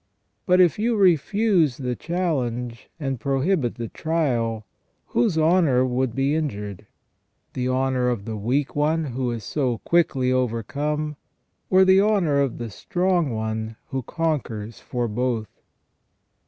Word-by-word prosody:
But 180 0 +5
if 180 +3 +4
you 230 +2 +1
refuse 185 - +3
the 125 -3 -2
challenge 125 -9 -2
and 135 -4 -2
prohibit 140 0 0
the 120 -2 -5
trial, 120 -9 -1 0.4
whose 120 +7 +1
honour 155 -6 +4
would 125 -1 -1
be 135 +2 +1
injured? 105 - -3 0.7
The 125 0 -1
honour 130 -1 +1
of 115 -5 -2
the 110 -1 -4
weak 125 +7 -1
one 155 +2 +1
who 130 -1 -2
is 115 -2 -4
so 130 -6 -1
quickly 135 -7 +2
overcome, 140 +5 -1 0.5
or 190 0 +6
the 190 +1 +6
honour 195 -9 +2
of 135 -3 -1
the 120 -2 -5
strong 175 - 0
one 110 -1 -3 0.2
who 135 - -1
conquers 120 -8 -3
for 120 -2 -3
both 115 -1 -3
135 Hz, 135 wpm, -23 LUFS, 120-160 Hz, 0.7 s, or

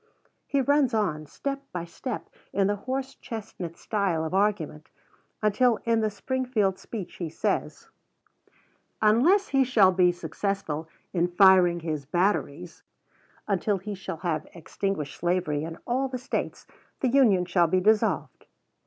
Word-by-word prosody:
He 280 - +1
runs 275 -3 +2
on, 155 -8 -1
step 275 - -4
by 175 -1 -4
step, 220 +7 -6 0.2
in 195 - +2
the 205 +1 +1
horse 260 +5 -4
chestnut 195 -7 -7
style 190 -7 -1
of 160 - -4
argument, 190 -7 0 0.5
until 225 +2 +3
in 230 -1 +3
the 215 -1 +1
Springfield 220 -3 -1
speech 205 -7 -7
he 170 -3 -4
says, 155 - -2 1.1
"Unless 265 - +4
he 270 -1 +4
shall 220 -7 +5
be 180 -1 +4
successful 165 -2 -3 0.2
in 175 -1 +2
firing 180 -1 +5
his 155 -4 -4
batteries 175 -1 -1 0.7
until 200 0 +1
he 205 +3 -6
shall 190 -4 -6
have 160 -3 -2
extinguished 170 -2 -4
slavery 175 -4 0
in 165 +1 -6
all 260 +2 0
the 255 -1 -4
States, 250 +2 -4 0.4
the 260 - +2
Union 230 -9 +4
shall 175 -1 +3
be 185 +3 +2
dissolved." 215 +3 +1
195 Hz, 140 wpm, -27 LUFS, 170-230 Hz, 1.1 s, shall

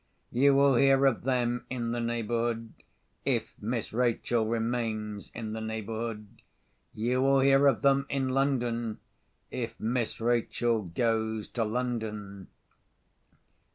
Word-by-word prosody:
You 140 +3 +4
will 140 -2 +5
hear 135 +1 +5
of 130 -3 +2
them 125 -2 0
in 120 -2 -2
the 120 - -1
neighbourhood, 115 0 -1 0.5
if - - 0
Miss 115 +1 -3
Rachel 120 -1 +1
remains 115 -2 -2
in 110 -2 -5
the 110 - -4
neighbourhood. 110 -1 -5 0.5
You 125 +4 0
will 135 0 +4
hear 135 +1 +5
of 135 -5 +2
them 140 0 +3
in 135 -2 0
London, 120 -4 0 0.5
if 120 -2 -4
Miss 115 +1 -1
Rachel 120 0 +1
goes 110 +3 -1
to 120 - -1
London." 110 -4 -3
120 Hz, 120 wpm, -29 LUFS, 110-125 Hz, 0.5 s, will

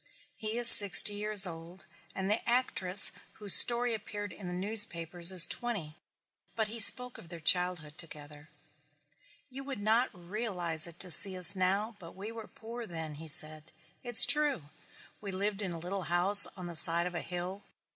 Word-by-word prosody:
He 220 0 -7
is 240 -1 +2
sixty 205 -2 +8
years 205 -1 +1
old 170 +2 -12 0.3
and 190 0 -7
the 210 +3 -4
actress 205 -6 -2 0.2
whose 205 -2 -2
story 240 0 +3
appeared 205 -2 -10
in 185 +1 -12
the - - -9
newspapers 180 -4 -1
is 185 -2 +5
twenty, 200 -11 -8 0.6
but 220 -2 -5
he 230 +2 -9
spoke 250 +3 +3
of 165 - -16
their 170 -1 -12
childhood 175 -2 -3
together. 150 -2 -12 1.0
"You 270 +2 -11
would 270 -2 -10
not 220 +4 -3
realize 175 -4 -4
it 170 0 -15
to 180 - -3
see 190 +3 +5
us 180 +2 +5
now 200 +4 -5
but 165 -3 -16
we 200 +4 -11
were 225 -1 -13
poor 230 +1 -13
then," 160 -3 -10
he 160 - -12
said. 155 +2 -1 0.3
"It's 240 -2 +3
true. 290 - -2 0.5
We 200 -2 -10
lived 200 +2 -6
in 190 -3 -7
a 170 - -10
little 180 +2 -9
house 185 +4 +5
on 180 - -11
the 170 -1 -11
side 170 +1 +4
of 180 - -9
a 170 - -8
hill. 180 +3 -10
190 Hz, 175 wpm, -27 LUFS, 170-215 Hz, 1.0 s, sixty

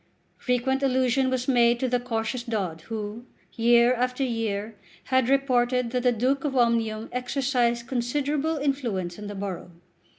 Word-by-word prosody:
Frequent 260 +2 0
allusion 260 -1 +2
was 255 -1 -2
made 240 -2 +4
to 260 - 0
the 245 0 +1
cautious 235 0 -3
Dod 195 -9 -3
who, 220 +1 -5 0.3
year 235 +1 +4
after 250 +2 -1
year, 225 -3 -2 0.3
had 260 -2 +1
reported 250 -3 +2
that 250 0 0
the 250 0 +3
Duke 255 +4 0
of 275 -3 -1
Omnium 230 -2 +1
exercised 250 -2 0
considerable 285 +6 -1
influence 235 -12 -2
in 210 - -7
the 205 - -6
borough. 195 -3 -5
245 Hz, 145 wpm, -26 LUFS, 225-260 Hz, 0.3 s, made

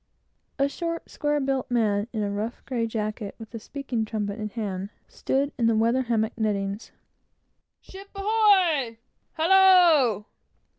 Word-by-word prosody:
A 275 -1 +2
short, 335 +3 -4
square 295 0 -1
built 270 -2 -1
man, 215 -3 +1
in 220 -3 -2
a 200 - -2
rough 215 +4 -5
grey 235 -3 -2
jacket, 215 -2 -4
with 225 0 -12
a 230 - -5
speaking 255 -1 -4
trumpet 210 -1 -4
in 215 0 -4
hand, 200 -4 -4 0.2
stood 280 +2 -1
in 230 - +3
the 230 - +3
weather 230 +4 +2
hammock 230 -3 -1
nettings. 200 -1 -2 0.9
"Ship 390 +1 -12
ahoy!" 390 - +2 0.4
"Hallo!" 335 - +5
235 Hz, 140 wpm, -25 LUFS, 215-295 Hz, 0.9 s, Hallo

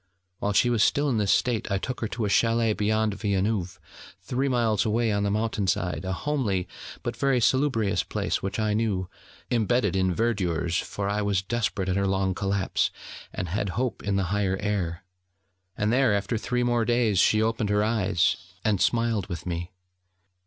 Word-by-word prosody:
While 105 - -1
she 120 +4 +3
was 115 -3 +2
still 145 +6 +3
in 115 -5 +1
this 100 -2 +2
state 120 -4 +1
I 100 - +2
took 125 +6 -4
her 110 - 0
to 115 0 -3
a - - 0
chalet 115 +1 +3
beyond 110 0 +1
Villeneuve, 100 -2 -1 0.4
three 130 +2 -2
miles 115 -5 +2
away 115 +1 +1
on 100 0 0
the 100 - +1
mountain 105 -1 -1
side, 90 -2 -1
a 95 - -2
homely, 100 -6 -1 0.4
but 120 - -3
very 135 +1 +2
salubrious 120 -4 +2
place - - -2
which 95 +3 -3
I 105 -1 +1
knew, 105 -4 0 0.4
imbedded 115 -4 +2
in 95 -1 +2
verdures, 90 -5 0
for 100 -1 -4
I 105 +1 0
was 100 -2 0
desperate 100 -3 -1
at 95 0 0
her 100 0 +1
long 95 0 +1
collapse, 100 0 0 0.4
and 90 - -4
had 100 +3 -1
hope 125 -1 -1
in 100 -1 -1
the 100 - +1
higher 100 -2 +1
air. 95 -4 -2 0.7
And 105 +2 +1
there 130 -5 +3
after 100 +4 -1
three 125 +2 -1
more 120 -1 +2
days, 115 -4 +2
she 110 - +4
opened 110 -1 0
her 105 0 +2
eyes, 105 -7 +2 0.3
and 105 -4 +2
smiled 115 -4 +1
with 85 -1 -6
me. 85 -1 -3
105 Hz, 185 wpm, -26 LUFS, 95-115 Hz, 0.7 s, she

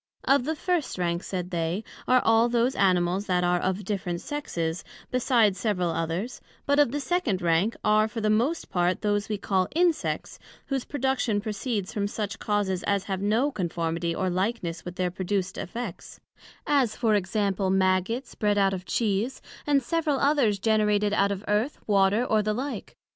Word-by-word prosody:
Of 275 -2 +3
the 315 +2 -1
first 340 - -1
rank, 175 -1 -1
said 180 -1 -4
they, 170 +4 -1 0.2
are 255 0 +4
all 225 +1 +4
those 240 +2 +2
Animals 185 -1 +2
that 180 -1 +1
are 175 0 +2
of 190 +2 -2
different 185 -4 -2
sexes, 170 - -3 0.3
besides 235 -6 +3
several 185 -5 0
others; 165 +8 -3 0.2
but 285 +1 +2
of 290 -5 +4
the 290 - -2
second 265 - 0
rank 175 +6 +2
are 215 0 +4
for 225 +1 -5
the 215 - 0
most 250 +10 0
part 180 0 +1
those 205 0 0
we 210 - -1
call 190 -2 0
Insects, 345 -1 0 0.3
whose 270 -2 -2
production 265 -6 0
proceds 210 -1 -3
from 200 -1 -1
such 205 -1 -4
causes 200 -3 0
as 200 -1 +1
have 190 -1 -3
no 225 +8 +2
conformity 170 -3 -2
or 190 - -1
likeness 185 -2 -2
with 175 0 -7
their 180 -1 -1
produced 190 +1 -2
Effects; 230 0 -6 0.5
as 265 -7 +2
for 225 -3 +1
example, 195 -1 0
Maggots 190 +6 +1
bred 205 -1 +1
out 195 -1 +3
of 185 -1 -5
Cheese, 215 +5 0 0.3
and 280 -2 +3
several 310 0 0
others 275 -8 +3
generated 210 0 +2
out 200 -1 +2
of 200 +1 -4
Earth, 215 +7 0
Water, 200 +3 +3
and 215 -1 +2
the 215 0 0
like. 275 +4 -5
205 Hz, 175 wpm, -26 LUFS, 185-240 Hz, 0.5 s, are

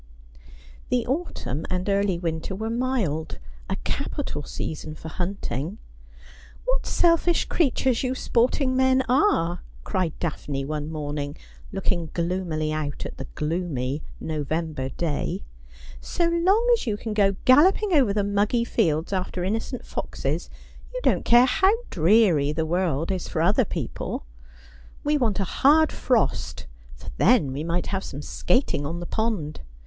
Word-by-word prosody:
The 250 -1 +1
autumn 255 - -3
and 185 +1 -2
early 200 -2 +2
winter 165 +2 -3
were 220 +3 -3
mild 230 - -1 0.2
— - - -22
a - - 0
capital 150 - -3
season 155 +1 -5
for 160 - -8
hunting. 175 -3 -3
'• - - -14 0.9
What - - 0
selfish 340 0 +3
creatures 260 -6 +1
you 255 0 -1
sporting 255 +2 +1
men 260 0 +4
are 245 - +2
!' - - -21
cried 185 -6 -1
Daphne 145 -4 -3
one 150 +1 -3
morning, 145 -1 -4 0.3
looking 180 -4 -1
gloomily 170 -3 -1
out 150 -2 -3
at - - -7
the 135 - -6
gloomy 150 -4 -2 0.2
November 155 -2 -2
day; 170 +5 -2 0.3
' - - -20 0.2
so 340 -1 0
long 370 +7 +3
as 455 - 0
you 210 -2 0
can 220 0 -4
go 200 -2 +3
galloping 365 +9 +5
over 265 -9 +5
the 205 0 +1
muggy 205 +4 +1
fields 165 -7 +1
after 185 -1 -2
inno 215 +5 0
cent 250 - -7
foxes - - -3 0.4
you - - -4
don't - - +2
care 240 +1 +7
how 380 - +4 0.2
dreary 170 -5 +4
the 160 +1 -1
world 170 -1 0
is 185 -2 -3
for - - -3
other 210 +8 +4
people. 150 - -4 0.8
We 295 +1 +2
want 220 -6 +1
a - - +2
hard 300 - +4
frost, 230 - 0 0.3
for - - -9
then 135 -4 +4
we 145 +3 -3
might 170 +2 -1
have 195 0 -1
some 145 +2 -6
skating 180 - +1
on 165 +4 -3
the 175 - -5
pond. 205 -9 -2
185 Hz, 155 wpm, -25 LUFS, 155-250 Hz, 0.9 s, care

